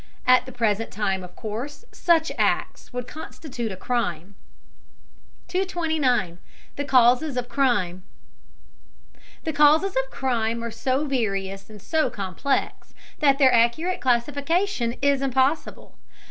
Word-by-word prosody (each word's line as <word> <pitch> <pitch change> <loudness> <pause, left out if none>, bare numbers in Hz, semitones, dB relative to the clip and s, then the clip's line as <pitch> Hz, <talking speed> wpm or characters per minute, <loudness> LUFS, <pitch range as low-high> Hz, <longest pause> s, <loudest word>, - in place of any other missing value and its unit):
At 255 +1 +5
the - - -7
present 225 -2 0
time, 195 -3 -2
of 180 0 -12
course, 245 - -6
such 330 -2 +2
acts - - 0
would 250 -1 -4
constitute 255 -7 -6
a - - -5
crime. 200 -4 -2 1.1
229. 315 - 0 0.4
THE 285 - -2
CAUSES 255 +2 +4
OF 245 -1 -2
CRIME. 205 -11 0 1.4
The 320 - -2
causes 300 +6 +4
of 265 0 0
crime 235 -3 -1
are 235 - -4
so 260 +6 -1
various 195 -7 -2
and 215 -1 -11
so 315 - 0
complex 200 +8 -3 0.2
that 275 -3 +4
their 265 -3 +5
accurate 240 +11 +2
classification 280 +3 0
is 280 -1 +3
impossible. 270 +3 0
255 Hz, 120 wpm, -24 LUFS, 225-290 Hz, 1.4 s, At